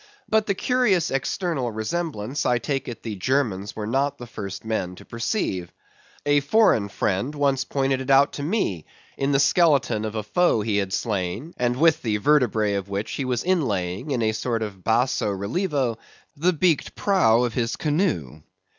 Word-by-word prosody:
But 220 Hz, -1 st, +2 dB
the 200 Hz, -, +1 dB
curious 210 Hz, -7 st, +2 dB
external 135 Hz, -1 st, -1 dB
resemblance, 130 Hz, +2 st, -3 dB
I 125 Hz, -, +2 dB
take 135 Hz, +2 st, -3 dB
it 120 Hz, -, -7 dB
the 110 Hz, -, -4 dB
Germans 105 Hz, -3 st, -1 dB
were 105 Hz, -, -4 dB
not 135 Hz, +5 st, 0 dB
the 120 Hz, -, -8 dB
first 100 Hz, -3 st, -7 dB
men 95 Hz, -5 st, -2 dB
to -, -, -14 dB
perceive. 115 Hz, -, -2 dB, 0.5 s
A 145 Hz, 0 st, +4 dB
foreign 140 Hz, -, +3 dB
friend 100 Hz, +9 st, -1 dB
once 140 Hz, -2 st, +1 dB
pointed 135 Hz, -1 st, 0 dB
it 130 Hz, -, -6 dB
out 135 Hz, +1 st, +5 dB
to -, -, -5 dB
me, 140 Hz, -, -1 dB, 0.3 s
in 135 Hz, +1 st, 0 dB
the 135 Hz, -, +3 dB
skeleton 140 Hz, -7 st, +3 dB
of 110 Hz, 0 st, -4 dB
a 110 Hz, -, -2 dB
foe 115 Hz, -, +2 dB
he 105 Hz, -1 st, 0 dB
had 100 Hz, -2 st, -1 dB
slain, 105 Hz, -, -2 dB
and 125 Hz, 0 st, 0 dB
with 160 Hz, +2 st, +4 dB
the 110 Hz, -3 st, 0 dB
vertebræ 110 Hz, -4 st, +2 dB
of 100 Hz, 0 st, -10 dB
which 100 Hz, +2 st, -3 dB
he 135 Hz, -, -3 dB
was 125 Hz, -2 st, -1 dB
inlaying, 120 Hz, -, -1 dB
in 125 Hz, -5 st, 0 dB
a 110 Hz, -, +2 dB
sort 115 Hz, +1 st, -2 dB
of 100 Hz, -4 st, -7 dB
basso 115 Hz, 0 st, +1 dB
relievo, 120 Hz, -, -1 dB, 0.4 s
the 170 Hz, +5 st, +2 dB
beaked 165 Hz, -2 st, +1 dB
prow 125 Hz, -, +3 dB
of 120 Hz, -2 st, -1 dB
his 115 Hz, -2 st, -1 dB
canoe. 145 Hz, -, -1 dB
125 Hz, 180 wpm, -24 LUFS, 105-145 Hz, 0.5 s, out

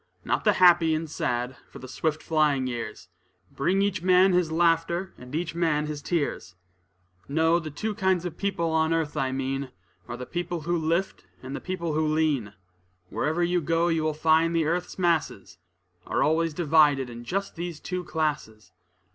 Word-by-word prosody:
Not -, -, -1 dB
the 210 Hz, -, +5 dB
happy 175 Hz, -3 st, +5 dB
and 160 Hz, +1 st, -3 dB
sad, 125 Hz, -4 st, -2 dB
for -, -, -12 dB
the 130 Hz, -, -10 dB
swift 155 Hz, +4 st, -2 dB
flying 150 Hz, -4 st, +2 dB
years 120 Hz, -4 st, -5 dB, 0.4 s
Bring 185 Hz, +8 st, +1 dB
each 200 Hz, -3 st, -1 dB
man 185 Hz, +1 st, +5 dB
his 175 Hz, -3 st, +2 dB
laughter 170 Hz, +2 st, +1 dB
and 125 Hz, +3 st, -9 dB
each 165 Hz, -1 st, -2 dB
man 160 Hz, -3 st, +1 dB
his 150 Hz, -1 st, -5 dB
tears. 145 Hz, -, -2 dB, 0.7 s
No; 160 Hz, +3 st, +2 dB
the 160 Hz, -2 st, -6 dB
two 215 Hz, +9 st, -3 dB
kinds 190 Hz, -4 st, +1 dB
of 170 Hz, -2 st, -4 dB
people 175 Hz, -4 st, -1 dB
on 160 Hz, 0 st, +2 dB
earth 155 Hz, -2 st, -2 dB
I 135 Hz, -3 st, 0 dB
mean, 135 Hz, 0 st, -3 dB, 0.4 s
Are 120 Hz, -, -6 dB
the 125 Hz, -, -6 dB
people 175 Hz, +1 st, -4 dB
who 170 Hz, +3 st, -1 dB
lift, 170 Hz, +3 st, -1 dB, 0.2 s
and 130 Hz, +2 st, -6 dB
the -, -, -6 dB
people 170 Hz, -4 st, -3 dB
who 155 Hz, +1 st, +1 dB
lean. 150 Hz, -9 st, 0 dB, 0.6 s
Wherever 160 Hz, +3 st, 0 dB
you 175 Hz, 0 st, +1 dB
go, 165 Hz, +2 st, +1 dB
you 165 Hz, -1 st, +1 dB
will 155 Hz, -1 st, -1 dB
find 160 Hz, +2 st, +3 dB
the 165 Hz, -2 st, +2 dB
earth's 175 Hz, +3 st, -2 dB
masses, 165 Hz, -, -1 dB, 0.5 s
Are -, -, +1 dB
always 160 Hz, 0 st, +1 dB
divided 150 Hz, -5 st, +3 dB
in 120 Hz, -1 st, -9 dB
just 195 Hz, +10 st, -3 dB
these 170 Hz, -2 st, -5 dB
two 180 Hz, 0 st, -4 dB
classes. 150 Hz, -11 st, -3 dB
160 Hz, 180 wpm, -26 LUFS, 145-175 Hz, 0.7 s, the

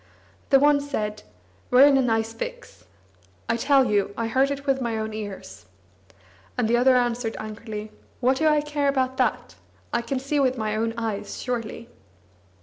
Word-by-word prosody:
The 270 Hz, -, +6 dB
one 290 Hz, 0 st, +4 dB
said: 210 Hz, -7 st, -3 dB, 0.5 s
"We're 255 Hz, +2 st, +7 dB
in 285 Hz, -1 st, +5 dB
a 270 Hz, -, +4 dB
nice 225 Hz, -2 st, 0 dB
fix! -, -, -8 dB, 0.6 s
I -, -, +1 dB
tell 270 Hz, +3 st, +3 dB
you, 205 Hz, -2 st, 0 dB
I 230 Hz, -, -1 dB
heard 265 Hz, +4 st, +2 dB
it 280 Hz, 0 st, -4 dB
with 270 Hz, -1 st, +1 dB
my 235 Hz, -2 st, -1 dB
own 220 Hz, 0 st, -3 dB
ears!" 205 Hz, -, -8 dB, 0.9 s
And -, -, +1 dB
the 235 Hz, -, +3 dB
other 255 Hz, +2 st, +4 dB
answered 240 Hz, -2 st, 0 dB
angrily: 215 Hz, 0 st, -7 dB, 0.3 s
"What 260 Hz, +1 st, +2 dB
do 315 Hz, -, +2 dB
I 300 Hz, -1 st, +4 dB
care 295 Hz, -1 st, -1 dB
about 260 Hz, -1 st, 0 dB
that? 235 Hz, -, 0 dB, 0.4 s
I -, -, +1 dB
can 235 Hz, +3 st, -3 dB
see 275 Hz, +3 st, -1 dB
with 260 Hz, -2 st, +2 dB
my 215 Hz, -1 st, -2 dB
own 225 Hz, +1 st, -1 dB
eyes, 215 Hz, -3 st, -4 dB
surely." 230 Hz, -2 st, -4 dB
245 Hz, 175 wpm, -24 LUFS, 220-275 Hz, 0.9 s, We're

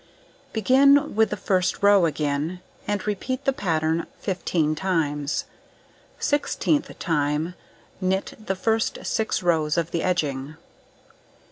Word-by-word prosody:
Begin 275 Hz, +6 st, +4 dB
with 220 Hz, 0 st, +4 dB
the 210 Hz, -, -3 dB
first 185 Hz, 0 st, 0 dB
row 200 Hz, -4 st, +6 dB
again, 150 Hz, +3 st, -2 dB, 0.3 s
and 205 Hz, -2 st, -1 dB
repeat 215 Hz, +5 st, -3 dB
the 270 Hz, -, +3 dB
pattern 165 Hz, -6 st, 0 dB
15 175 Hz, -5 st, 0 dB
times; 150 Hz, -5 st, -1 dB, 0.7 s
16th 290 Hz, +1 st, 0 dB
time, 150 Hz, 0 st, 0 dB, 0.5 s
knit 190 Hz, +1 st, 0 dB
the 195 Hz, -2 st, -2 dB
first 225 Hz, +4 st, 0 dB
6 220 Hz, -2 st, -1 dB
rows 160 Hz, -2 st, +2 dB
of 170 Hz, -1 st, 0 dB
the 170 Hz, -, -1 dB
edging. 150 Hz, -5 st, -1 dB
180 Hz, 115 wpm, -24 LUFS, 155-210 Hz, 0.7 s, row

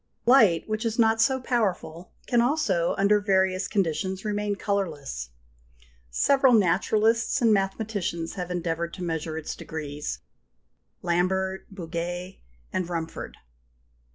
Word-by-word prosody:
Light, 220 Hz, -10 st, +5 dB
which 215 Hz, +1 st, -2 dB
is 230 Hz, -1 st, -1 dB
not 225 Hz, -1 st, +4 dB
so 260 Hz, +3 st, +3 dB
powerful, 185 Hz, -9 st, -2 dB
can 240 Hz, -1 st, +3 dB
also, 235 Hz, -, +1 dB
under 200 Hz, +1 st, +4 dB
various 190 Hz, -2 st, +1 dB
conditions, 190 Hz, +1 st, -1 dB
remain 205 Hz, -1 st, -1 dB
colourless. 155 Hz, -, -3 dB, 0.8 s
Several 265 Hz, -, +4 dB
naturalists 220 Hz, +5 st, +3 dB
and 230 Hz, -4 st, +4 dB
mathematicians 195 Hz, -4 st, -2 dB
have 180 Hz, -2 st, -5 dB
endeavoured 170 Hz, -1 st, -2 dB
to 185 Hz, -, -6 dB
measure 160 Hz, -2 st, -3 dB
its 160 Hz, -, -5 dB
degrees 150 Hz, -2 st, -5 dB, 0.9 s
Lambert, 190 Hz, +2 st, 0 dB
Bouguer, 175 Hz, 0 st, -5 dB, 0.4 s
Rumford. 170 Hz, -2 st, -4 dB
190 Hz, 110 wpm, -26 LUFS, 170-215 Hz, 0.9 s, Light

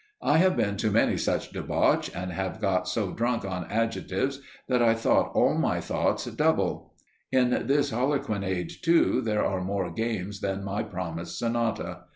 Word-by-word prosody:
I 150 Hz, -, +4 dB
have 185 Hz, +1 st, +4 dB
been 100 Hz, -1 st, 0 dB
to 110 Hz, -, +1 dB
many 105 Hz, +2 st, +3 dB
such -, -, -1 dB
debauch, -, -, +1 dB
and 90 Hz, +1 st, -4 dB
have 95 Hz, +4 st, -3 dB
got 95 Hz, -3 st, 0 dB
so 95 Hz, 0 st, -1 dB
drunk 120 Hz, -1 st, -1 dB
on 90 Hz, -3 st, -4 dB
adjectives 115 Hz, +5 st, -1 dB, 0.3 s
that 125 Hz, -2 st, +2 dB
I 115 Hz, -1 st, +4 dB
thought 115 Hz, -, +2 dB
all -, -, +4 dB
my -, -, +1 dB
thoughts -, -, -1 dB
double. -, -, 0 dB, 0.4 s
In 125 Hz, -1 st, +3 dB, 0.2 s
this 140 Hz, 0 st, +2 dB
Harlequinade, 105 Hz, -, -1 dB
too, 170 Hz, -1 st, +3 dB
there 105 Hz, -2 st, 0 dB
are 95 Hz, -1 st, -1 dB
more 100 Hz, +2 st, -2 dB
games 105 Hz, -4 st, -3 dB
than 100 Hz, 0 st, -2 dB
my 100 Hz, +1 st, -2 dB
promised 85 Hz, -2 st, -5 dB
Sonata. 115 Hz, -1 st, -2 dB
105 Hz, 165 wpm, -27 LUFS, 95-120 Hz, 0.4 s, I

